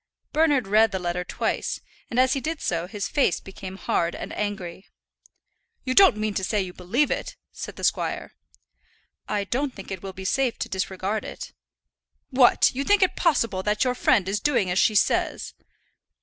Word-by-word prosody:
Bernard 295 Hz, -5 st, +3 dB
read 215 Hz, +2 st, +4 dB
the 190 Hz, -, -1 dB
letter 180 Hz, 0 st, -2 dB
twice, -, -, -2 dB, 0.3 s
and 245 Hz, -, 0 dB
as 260 Hz, 0 st, +4 dB
he 275 Hz, -, -2 dB
did 315 Hz, +3 st, -3 dB
so 170 Hz, 0 st, -2 dB
his 205 Hz, 0 st, -4 dB
face 280 Hz, -, +1 dB
became 190 Hz, -1 st, -9 dB
hard 170 Hz, -3 st, 0 dB
and -, -, -6 dB
angry. 195 Hz, -3 st, -4 dB, 1.0 s
"You 255 Hz, -, -1 dB
don't 380 Hz, -, +7 dB
mean 215 Hz, -1 st, -1 dB
to 190 Hz, -, -2 dB
say 210 Hz, +3 st, 0 dB
you 185 Hz, -2 st, -3 dB
believe 230 Hz, +13 st, 0 dB
it?" -, -, -3 dB, 0.2 s
said -, -, -7 dB
the -, -, -10 dB
squire. -, -, -1 dB, 1.0 s
"I 205 Hz, -1 st, 0 dB
don't 260 Hz, +6 st, -2 dB
think 195 Hz, -1 st, -10 dB
it 190 Hz, -2 st, -5 dB
will 195 Hz, -, -6 dB
be 190 Hz, 0 st, -8 dB
safe 255 Hz, +4 st, +1 dB
to -, -, -4 dB
disregard 190 Hz, +2 st, -2 dB
it." -, -, -8 dB, 0.8 s
"What! 255 Hz, -2 st, +5 dB
you 270 Hz, +2 st, -2 dB
think 410 Hz, +6 st, +4 dB
it 370 Hz, -, +1 dB
possible 230 Hz, -, +1 dB
that 210 Hz, +3 st, +1 dB
your 250 Hz, -1 st, +1 dB
friend 230 Hz, -5 st, +2 dB
is 200 Hz, +2 st, 0 dB
doing 235 Hz, -8 st, +1 dB
as 180 Hz, -, +2 dB
she 215 Hz, -, +3 dB
says?" -, -, +1 dB
210 Hz, 185 wpm, -25 LUFS, 190-255 Hz, 1.0 s, don't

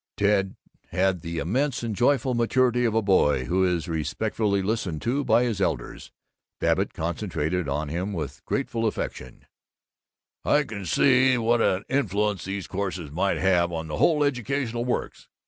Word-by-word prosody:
Ted 100 Hz, -1 st, +2 dB, 0.3 s
had 95 Hz, -2 st, 0 dB
the 85 Hz, 0 st, -5 dB
immense 125 Hz, -, -1 dB
and 115 Hz, -3 st, -2 dB
joyful 130 Hz, +2 st, +2 dB
maturity 125 Hz, +1 st, +2 dB
of 110 Hz, -2 st, 0 dB
a 115 Hz, -, +2 dB
boy 75 Hz, -9 st, +3 dB
who 90 Hz, +6 st, +1 dB
is 90 Hz, -2 st, 0 dB
respectfully 100 Hz, +6 st, -1 dB
listened 95 Hz, -6 st, -2 dB
to 135 Hz, -, -1 dB
by 120 Hz, -1 st, +3 dB
his 115 Hz, -5 st, -1 dB
elders. -, -, -3 dB, 0.5 s
Babbitt -, -, +1 dB
concentrated 85 Hz, -1 st, -2 dB
on 75 Hz, +2 st, -2 dB
him 90 Hz, +6 st, -3 dB
with 75 Hz, -7 st, -5 dB
grateful 115 Hz, -1 st, -1 dB
affection: 65 Hz, -, -5 dB, 1.0 s
"I 150 Hz, -, +3 dB
can 100 Hz, -8 st, -7 dB
see 130 Hz, -, +4 dB
what 115 Hz, 0 st, +2 dB
an 95 Hz, -1 st, +1 dB
influence 105 Hz, -6 st, 0 dB
these 95 Hz, 0 st, -4 dB
courses 95 Hz, -6 st, -4 dB
might 95 Hz, +5 st, 0 dB
have 90 Hz, -2 st, +2 dB
on 80 Hz, -1 st, -4 dB
the 75 Hz, -, -3 dB
whole 150 Hz, -3 st, +3 dB
educational 125 Hz, -3 st, -1 dB
works. 125 Hz, -, -3 dB
100 Hz, 155 wpm, -25 LUFS, 85-120 Hz, 1.0 s, see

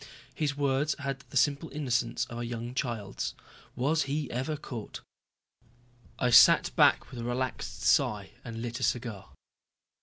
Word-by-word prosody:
His 145 Hz, -2 st, -2 dB
words 140 Hz, +1 st, +1 dB
had 135 Hz, -1 st, -4 dB
the 140 Hz, -, -2 dB
simple 140 Hz, +5 st, +2 dB
innocence 125 Hz, -5 st, -1 dB
of 120 Hz, -, -8 dB
a -, -, -3 dB
young 120 Hz, 0 st, -5 dB
child's. 115 Hz, -6 st, -3 dB, 0.4 s
Was 145 Hz, +5 st, +1 dB
he 145 Hz, -1 st, -2 dB
ever 130 Hz, +6 st, -2 dB
caught. 120 Hz, -7 st, -7 dB, 1.2 s
I 125 Hz, -, +1 dB
sat 115 Hz, -, +7 dB
back -, -, +4 dB
with 125 Hz, -, -7 dB
a -, -, -4 dB
relaxed 125 Hz, +2 st, -3 dB
sigh -, -, +2 dB
and 115 Hz, 0 st, -6 dB
lit 120 Hz, -1 st, -4 dB
a -, -, -4 dB
cigar. 115 Hz, -, -2 dB
125 Hz, 150 wpm, -29 LUFS, 120-140 Hz, 1.2 s, sat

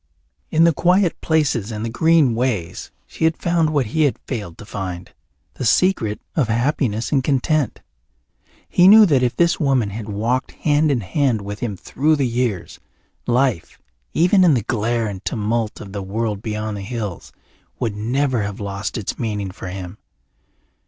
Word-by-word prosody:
In 160 Hz, -, +3 dB
the 170 Hz, -1 st, +5 dB
quiet 180 Hz, +3 st, +2 dB
places 140 Hz, -9 st, 0 dB
and 110 Hz, +1 st, -4 dB
the -, -, -2 dB
green 160 Hz, -1 st, +3 dB
ways 110 Hz, -8 st, -2 dB, 0.2 s
she -, -, -7 dB
had 160 Hz, 0 st, +2 dB
found 170 Hz, -2 st, +1 dB
what 145 Hz, -4 st, +1 dB
he 155 Hz, +9 st, -1 dB
had 140 Hz, -, 0 dB
failed 105 Hz, -10 st, -5 dB
to -, -, -11 dB
find 95 Hz, -4 st, -6 dB, 0.4 s
the -, -, -6 dB
secret 115 Hz, -, +2 dB, 0.2 s
of 140 Hz, -8 st, +2 dB
happiness 120 Hz, -1 st, 0 dB
and 135 Hz, -3 st, +2 dB
content. 140 Hz, +1 st, 0 dB, 0.9 s
He 180 Hz, -, +4 dB
knew 215 Hz, +2 st, +9 dB
that 145 Hz, -8 st, +3 dB
if 125 Hz, -1 st, 0 dB
this 170 Hz, -1 st, +2 dB
woman 130 Hz, -8 st, +1 dB
had 110 Hz, +1 st, -6 dB
walked 115 Hz, +5 st, -1 dB
hand 150 Hz, 0 st, +1 dB
in 130 Hz, -5 st, +1 dB
hand 120 Hz, -, 0 dB
with 105 Hz, +1 st, -6 dB
him 105 Hz, -5 st, -3 dB
through 155 Hz, -, +1 dB
the 140 Hz, -3 st, 0 dB
years, 120 Hz, -6 st, -2 dB, 0.5 s
life, 125 Hz, -6 st, 0 dB, 0.3 s
even 180 Hz, +3 st, +4 dB
in 165 Hz, -6 st, +5 dB
the 115 Hz, -, -1 dB
glare 115 Hz, 0 st, -1 dB
and 100 Hz, -3 st, -6 dB
tumult 110 Hz, 0 st, -2 dB
of 100 Hz, -2 st, -10 dB
that 100 Hz, -, -4 dB
world 105 Hz, +1 st, -3 dB
beyond 105 Hz, -1 st, -4 dB
the -, -, -6 dB
hills, 105 Hz, -3 st, -5 dB, 0.5 s
would 110 Hz, -4 st, -2 dB
never 125 Hz, +3 st, 0 dB
have 100 Hz, -1 st, -4 dB
lost 100 Hz, +2 st, -4 dB
its 105 Hz, -, -4 dB
meaning 105 Hz, -5 st, -3 dB
for 95 Hz, -1 st, -9 dB
him. 90 Hz, +1 st, -7 dB
120 Hz, 170 wpm, -20 LUFS, 105-145 Hz, 0.9 s, knew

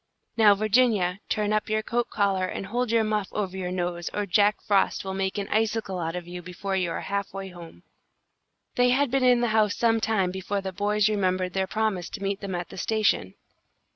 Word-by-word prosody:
Now, 215 Hz, -3 st, +6 dB
Virginia, 210 Hz, -3 st, +2 dB
turn 210 Hz, 0 st, 0 dB
up 215 Hz, 0 st, 0 dB
your 215 Hz, 0 st, 0 dB
coat 240 Hz, +1 st, -1 dB
collar 195 Hz, -3 st, +1 dB
and 195 Hz, -, -5 dB
hold 240 Hz, +4 st, -1 dB
your 230 Hz, 0 st, +3 dB
muff 215 Hz, -2 st, -1 dB
over 195 Hz, -3 st, -2 dB
your 185 Hz, -1 st, -3 dB
nose, 175 Hz, -1 st, -3 dB
or 205 Hz, -, -1 dB
Jack 205 Hz, +2 st, +3 dB
Frost 200 Hz, -1 st, +1 dB
will 190 Hz, -, -3 dB
make 190 Hz, +1 st, -2 dB
an 200 Hz, -1 st, -2 dB
icicle 215 Hz, -3 st, 0 dB
out 165 Hz, 0 st, -3 dB
of 175 Hz, -1 st, -6 dB
you 175 Hz, 0 st, -7 dB
before 180 Hz, +3 st, -4 dB
you 180 Hz, -2 st, 0 dB
are -, -, -3 dB
half 200 Hz, 0 st, -3 dB
way 195 Hz, 0 st, -5 dB
home. 170 Hz, -, -12 dB, 0.9 s
They 245 Hz, 0 st, +4 dB
had 265 Hz, +1 st, +2 dB
been 270 Hz, -1 st, +2 dB
in 250 Hz, -1 st, +5 dB
the 240 Hz, -, +1 dB
house 215 Hz, -1 st, +2 dB
some 225 Hz, -1 st, +2 dB
time 200 Hz, -5 st, +1 dB
before 190 Hz, +2 st, -3 dB
the 190 Hz, -1 st, -5 dB
boys 205 Hz, +2 st, +1 dB
remembered 185 Hz, -3 st, 0 dB
their 190 Hz, 0 st, 0 dB
promise 215 Hz, -4 st, -1 dB
to 200 Hz, -, -8 dB
meet 195 Hz, 0 st, -2 dB
them 195 Hz, -2 st, -4 dB
at 175 Hz, 0 st, -4 dB
the -, -, -10 dB
station. 215 Hz, -, +1 dB
200 Hz, 215 wpm, -26 LUFS, 185-215 Hz, 0.9 s, Now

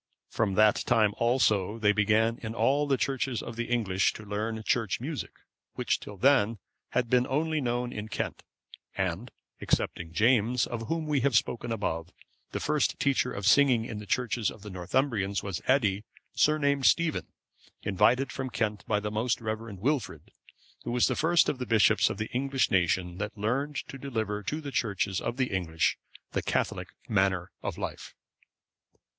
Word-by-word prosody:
From 100 Hz, -4 st, 0 dB
that 110 Hz, +1 st, +5 dB
time 110 Hz, -4 st, +3 dB
also 110 Hz, -4 st, +2 dB
they 105 Hz, -2 st, +3 dB
began 110 Hz, +2 st, +2 dB
in 110 Hz, -1 st, -6 dB
all 145 Hz, +4 st, +2 dB
the 135 Hz, -2 st, +2 dB
churches 130 Hz, -2 st, -1 dB
of 120 Hz, -, -7 dB
the 120 Hz, +1 st, -2 dB
English 105 Hz, -6 st, +1 dB
to 110 Hz, -, -10 dB
learn 110 Hz, +2 st, -3 dB
Church 110 Hz, -2 st, 0 dB
music, 145 Hz, +4 st, -4 dB, 0.5 s
which -, -, 0 dB
till 105 Hz, -, -10 dB
then 115 Hz, -1 st, +3 dB, 0.4 s
had 125 Hz, -1 st, +1 dB
been 125 Hz, +1 st, +3 dB
only 155 Hz, +3 st, 0 dB
known 120 Hz, -1 st, -1 dB
in 105 Hz, 0 st, -5 dB
Kent. -, -, -3 dB, 0.6 s
And, 95 Hz, +5 st, -2 dB, 0.3 s
excepting 85 Hz, -1 st, -1 dB
James, 115 Hz, +4 st, +3 dB
of 115 Hz, -2 st, -5 dB
whom 165 Hz, -1 st, -1 dB
we 150 Hz, -2 st, +1 dB
have 135 Hz, -3 st, +3 dB
spoken 120 Hz, 0 st, -1 dB
above,(536) 85 Hz, -6 st, -3 dB, 0.4 s
the -, -, -1 dB
first 150 Hz, -1 st, 0 dB
teacher 135 Hz, -2 st, +1 dB
of 100 Hz, -, -5 dB
singing 120 Hz, 0 st, +5 dB
in 110 Hz, -3 st, -5 dB
the 105 Hz, -, -10 dB
churches 120 Hz, -3 st, 0 dB
of 105 Hz, -, -11 dB
the 105 Hz, -, -8 dB
Northumbrians 100 Hz, +2 st, -1 dB
was 100 Hz, -3 st, -4 dB
Eddi, 105 Hz, -7 st, +2 dB, 0.3 s
surnamed 140 Hz, -3 st, +3 dB
Stephen,(537) 170 Hz, -2 st, +2 dB, 0.6 s
invited 125 Hz, +6 st, +3 dB
from 130 Hz, +3 st, -4 dB
Kent 105 Hz, -2 st, -2 dB
by 105 Hz, -1 st, +2 dB
the 105 Hz, 0 st, -4 dB
most 110 Hz, +3 st, 0 dB
reverend 110 Hz, -3 st, -5 dB
Wilfrid, 140 Hz, 0 st, -2 dB, 0.5 s
who -, -, -5 dB
was 120 Hz, 0 st, +3 dB
the -, -, +1 dB
first 165 Hz, +2 st, +3 dB
of 130 Hz, -, -1 dB
the 125 Hz, -, -4 dB
bishops 110 Hz, -2 st, +4 dB
of -, -, -4 dB
the 110 Hz, +1 st, -4 dB
English 135 Hz, +1 st, 0 dB
nation 90 Hz, -1 st, +1 dB
that 105 Hz, +2 st, -4 dB
learned 135 Hz, +8 st, -1 dB
to 135 Hz, -, -9 dB
deliver 110 Hz, -6 st, -3 dB
to 150 Hz, +10 st, -3 dB
the 145 Hz, -2 st, -6 dB
churches 100 Hz, -5 st, -1 dB
of 120 Hz, -, -3 dB
the 130 Hz, -3 st, 0 dB
English 85 Hz, -4 st, 0 dB, 0.3 s
the -, -, -1 dB
Catholic -, -, -1 dB, 0.2 s
manner 95 Hz, -4 st, +1 dB
of -, -, -4 dB
life. -, -, -6 dB
115 Hz, 175 wpm, -28 LUFS, 105-130 Hz, 0.6 s, that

